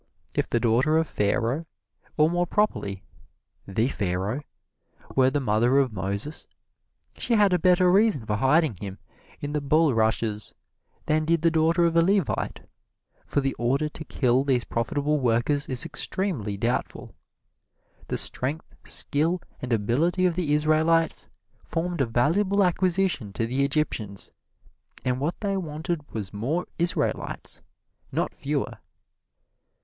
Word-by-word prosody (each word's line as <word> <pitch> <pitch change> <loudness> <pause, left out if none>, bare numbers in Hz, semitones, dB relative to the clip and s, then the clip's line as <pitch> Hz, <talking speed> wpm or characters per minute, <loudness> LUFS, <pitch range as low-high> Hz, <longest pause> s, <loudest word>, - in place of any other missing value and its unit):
If - - -1
the 120 - +1
daughter 125 +7 +3
of 160 0 +1
Pharaoh, 120 +10 0 0.5
or 155 0 +5
more 175 +1 0
properly 100 - -1 0.6
"the 110 +5 +1
Pharaoh," 100 +2 -2 0.7
were 130 -1 +5
the 145 +2 0
mother 120 +1 +2
of 135 -5 +2
Moses, 100 - -4 0.7
she 235 - 0
had 205 -3 +4
a 180 - +3
better 180 -1 +4
reason 195 - +3
for 105 -1 -1
hiding 135 - +3
him 100 0 -7 0.4
in 145 0 -4
the 150 - 0
bulrushes 115 -8 +1 0.5
than 155 +1 +2
did 165 0 +1
the 165 - +4
daughter 165 +2 +3
of 165 0 +1
a 165 - +6
Levite, 190 -1 0 0.7
for 145 - +1
the 135 0 -1
order 135 +6 +1
to 155 - -9
kill 130 -1 +2
these 130 -4 +1
profitable 145 +6 -1
workers 125 +4 +1
is 130 +3 +2
extremely 150 - -2
doubtful. 120 +5 -2 0.9
The - - -2
strength, 145 +6 -2
skill 160 +5 +2 0.2
and 125 - -5
ability 135 - +1
of 180 - +3
the 165 -4 -1
Israelites 155 +2 +2 0.3
formed 170 -1 -2
a 130 - +2
valuable 185 - +2
acquisition 180 - +1
to 115 - -1
the 130 +4 0
Egyptians, 135 -9 -2 0.7
and 125 0 0
what 150 +5 -2
they 200 -2 0
wanted 160 -2 -4
was 105 -4 -5
more 140 - -1
Israelites, 170 +1 -1 0.5
not - - -1
fewer. - - -3
145 Hz, 135 wpm, -26 LUFS, 115-165 Hz, 0.9 s, a